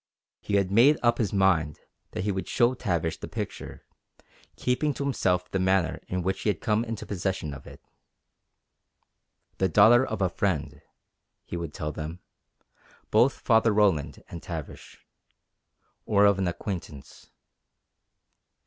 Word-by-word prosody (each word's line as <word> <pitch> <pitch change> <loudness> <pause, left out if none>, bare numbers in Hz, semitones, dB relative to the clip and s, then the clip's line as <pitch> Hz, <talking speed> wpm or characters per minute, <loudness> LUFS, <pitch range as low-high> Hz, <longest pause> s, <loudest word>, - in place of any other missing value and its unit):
He 100 - -2
had 100 -2 +1
made 125 +9 +5
up 120 0 +3
his 110 -5 0
mind 90 -7 +2 0.3
that - - -3
he 105 - 0
would 95 0 -4
show 120 0 +3
Tavish 85 -10 -2
the - - -7
picture, - - -7 0.7
keeping 135 +3 0
to - - -3
himself 90 -10 0
the 95 - 0
manner 95 -2 +1
in 90 -1 -2
which 95 +1 -2
he - - 0
had 105 - -1
come 110 -2 +1
into 115 -2 -6
possession 95 -6 -3
of 70 - -11
it. - - -12 1.8
The 95 - +2
daughter 110 +8 +6
of - - -4
a - - +3
friend, 90 -3 -2 0.6
he - - -7
would 85 -3 -4
tell 75 0 -4
them 80 +3 -6 0.9
both 120 +5 +3
Father 115 -1 +3
Roland 100 -8 +1
and 85 - -8
Tavish. 80 -4 -9 1.0
Or 100 -1 +4
of 100 -1 +4
an 95 - 0
acquaintance. 85 -5 -7
95 Hz, 145 wpm, -27 LUFS, 85-110 Hz, 1.8 s, daughter